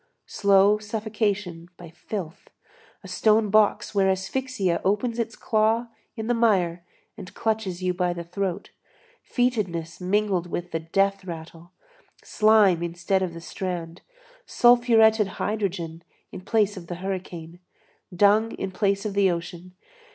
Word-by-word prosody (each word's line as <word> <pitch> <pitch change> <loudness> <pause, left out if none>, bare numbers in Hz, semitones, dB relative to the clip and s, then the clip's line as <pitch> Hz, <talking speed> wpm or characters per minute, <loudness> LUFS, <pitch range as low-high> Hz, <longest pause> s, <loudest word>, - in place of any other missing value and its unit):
slow 200 +1 +3
suffocation 210 -5 -3
by 170 -2 -12
filth, 175 0 -7 0.5
a - - -10
stone 210 +3 +2
box 215 0 +2
where 195 -1 +3
asphyxia 190 -1 -1
opens 225 +4 0
its 230 0 -2
claw 225 +1 +1 0.3
in 220 -2 -5
the 240 - +1
mire 185 -7 +1 0.3
and 180 - -10
clutches 215 -5 -2
you 180 0 +1
by 180 0 0
the 170 -1 -5
throat; 190 +2 -4 0.5
fetidness 190 -10 -2
mingled 190 -1 0
with 175 +1 -5
the 165 - -1
death 195 +4 0
rattle; 170 0 -9 0.5
slime 215 -5 +4
instead 175 +3 -1
of 175 -3 -3
the - - -7
strand, 175 -1 -5 0.5
sulfuretted 230 -3 +4
hydrogen 180 -6 -3 0.3
in - - -8
place 210 0 +1
of 175 -3 -10
the 175 - -5
hurricane, 180 -2 -6 0.5
dung 205 +5 +3
in 195 - -5
place 200 +1 0
of 210 - -2
the 200 -1 +3
ocean! 175 +1 -6
195 Hz, 135 wpm, -25 LUFS, 175-215 Hz, 0.5 s, slime